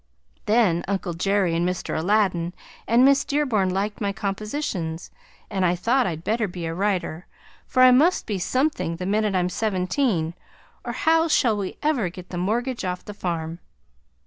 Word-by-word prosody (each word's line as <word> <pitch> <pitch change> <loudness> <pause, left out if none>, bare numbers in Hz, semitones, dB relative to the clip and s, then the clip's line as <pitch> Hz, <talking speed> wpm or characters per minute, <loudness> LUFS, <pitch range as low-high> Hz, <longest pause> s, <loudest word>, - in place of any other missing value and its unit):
Then 210 -6 +3
Uncle 190 -3 -2
Jerry 190 0 +1
and 170 - +1
Mr. 180 0 -2
Aladdin 180 -1 +1 0.3
and 235 +3 +5
Miss 275 0 +5
Dearborn 255 -10 +1
liked 200 +4 -2
my 200 -1 0
compositions, 195 - -4 0.4
and 190 -2 -2
I 180 0 +3
thought 240 +8 +2
I'd 165 -2 -4
better 220 +2 0
be 175 -2 -6
a 165 - -3
writer, 180 -2 -2 0.4
for 255 - +3
I 255 - +8
must 305 +9 +4
be 205 -3 -2
something 255 - 0
the 180 +2 -5
minute 210 0 +1
I'm 180 -1 +2
seventeen, 185 - 0 0.5
or - - -4
how 325 +1 +3
shall 240 -8 +3
we 200 -2 -4
ever 275 - +1
get 180 +1 -11
the 175 - -3
mortgage 235 +7 -1
off 180 -1 -3
the 210 - -7
farm? 170 -4 -4
195 Hz, 170 wpm, -24 LUFS, 175-235 Hz, 0.5 s, I